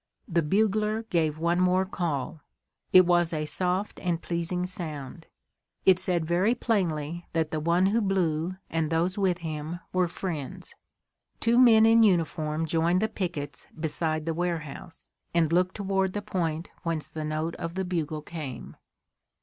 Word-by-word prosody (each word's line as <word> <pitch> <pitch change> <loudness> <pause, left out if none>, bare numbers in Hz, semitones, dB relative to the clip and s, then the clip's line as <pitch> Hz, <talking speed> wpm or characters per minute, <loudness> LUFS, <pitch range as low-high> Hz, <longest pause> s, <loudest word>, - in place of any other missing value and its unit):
The 170 -4 +2
bugler 215 +6 +1
gave 155 -3 +1
one 170 +2 +1
more 185 +1 +3
call. 160 -5 -3 0.5
It 185 0 +8
was 175 -1 +3
a 155 -2 -2
soft 185 +5 -1
and 175 -2 -1
pleasing 170 +1 -2
sound. 165 -4 -6 0.6
It 185 -1 +6
said 180 -3 +1
very 180 +8 +2
plainly 170 -8 -1
that 160 -2 0
the 155 - -1
one 170 +4 +2
who 215 +4 +2
blew 175 -5 +1 0.2
and 160 -1 -1
those 170 +4 0
with 185 -3 +2
him 155 +2 -4
were 185 -1 +2
friends. 165 -6 -6 0.7
Two 235 +2 +3
men 225 -3 +7
in 225 0 +6
uniform 165 -5 +2
joined 165 +3 +2
the - - +3
pickets 160 -9 -5
beside 155 0 -1
the 165 - -1
warehouse, 165 -1 -4 0.3
and 165 -1 +3
looked 180 +1 +2
toward 190 -2 0
the 205 - -3
point 170 -5 -2
whence 165 -4 -2
the 155 0 -6
note 155 +2 -2
of 165 +1 -5
the 190 0 -1
bugle 160 -4 -2
came. 155 -6 -7
170 Hz, 155 wpm, -27 LUFS, 160-185 Hz, 0.7 s, It